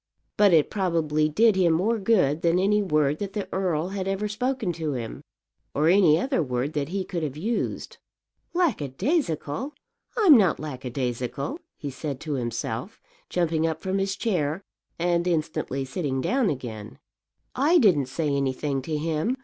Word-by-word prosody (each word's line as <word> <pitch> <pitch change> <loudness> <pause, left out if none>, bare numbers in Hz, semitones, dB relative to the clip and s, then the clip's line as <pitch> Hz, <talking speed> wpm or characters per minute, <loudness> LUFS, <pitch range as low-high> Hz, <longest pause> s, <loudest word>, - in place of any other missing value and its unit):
But 205 -2 +5
it 160 -3 +4
probably 160 -6 +1
did 215 +7 +4
him 175 -3 +3
more 215 +8 +1
good 185 -8 +2
than 170 +1 +3
any 205 +3 +3
word 150 -5 +1
that 200 -1 -4
the 205 -2 -3
earl 180 -3 0
had 190 -1 -3
ever 195 +2 -1
spoken 225 -2 -1
to 160 -3 -3
him, 115 -3 -5 0.5
or 150 +3 +3
any 175 -4 +5
other 265 - 0
word 130 +1 -2
that 145 -1 -2
he 190 +1 -2
could 175 -3 -3
have 150 -2 -4
used. 220 +8 -3 0.6
"Lackadaisical! 220 - -1 0.4
I'm 390 -10 +8
not 195 -8 +4
lackadaisical," 130 - -4 0.2
he 145 - -5
said 140 0 -5
to 155 -2 -3
himself, 120 - -3 0.3
jumping 165 -2 +1
up 160 -1 -4
from 190 +1 0
his 195 0 -1
chair, 180 -5 -1 0.3
and 175 0 +1
instantly 155 -5 -1
sitting 135 -1 -2
down 245 - +1
again. 110 - -6 0.6
"I 300 +7 +4
didn't 180 - +4
say 150 +4 -2
anything 140 0 -1
to 155 +3 -3
him. 160 - -1
165 Hz, 155 wpm, -25 LUFS, 145-200 Hz, 0.6 s, I'm